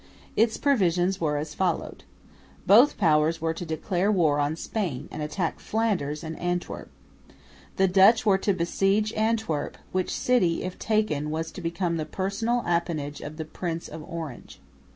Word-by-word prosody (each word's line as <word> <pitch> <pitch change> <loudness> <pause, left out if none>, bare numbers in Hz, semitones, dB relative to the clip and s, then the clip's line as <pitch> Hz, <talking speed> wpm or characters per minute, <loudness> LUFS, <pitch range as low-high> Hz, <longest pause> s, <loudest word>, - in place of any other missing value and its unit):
Its 225 0 +3
provisions 190 - +2
were 150 -2 +1
as 150 +1 -4
follows. 180 -4 -1 0.7
Both 235 +9 +6
Powers 160 -3 +3
were 165 0 -1
to 165 - -6
declare 175 +4 0
war 160 -7 +3
on 145 +2 0
Spain 165 - -3
and - - -6
attack 160 +3 -2
Flanders 185 -10 -1
and 160 0 -6
Antwerp. 175 0 -3 0.9
The 190 - +3
Dutch 195 +5 +5
were 195 -2 +4
to 200 - +1
besiege 195 +4 +1
Antwerp, 220 -8 -1
which 185 -1 -1
city, 205 -10 +1
if 185 0 -6
taken, 215 -10 0
was 160 +1 -3
to - - -8
become 170 0 -1
the 155 - -2
personal 200 +8 -1
appanage 165 -4 -1
of 150 +1 -7
the 160 - -4
Prince, 165 +1 -4
of 160 +1 -8
Orange. 160 -7 -7
175 Hz, 155 wpm, -26 LUFS, 160-200 Hz, 0.9 s, Both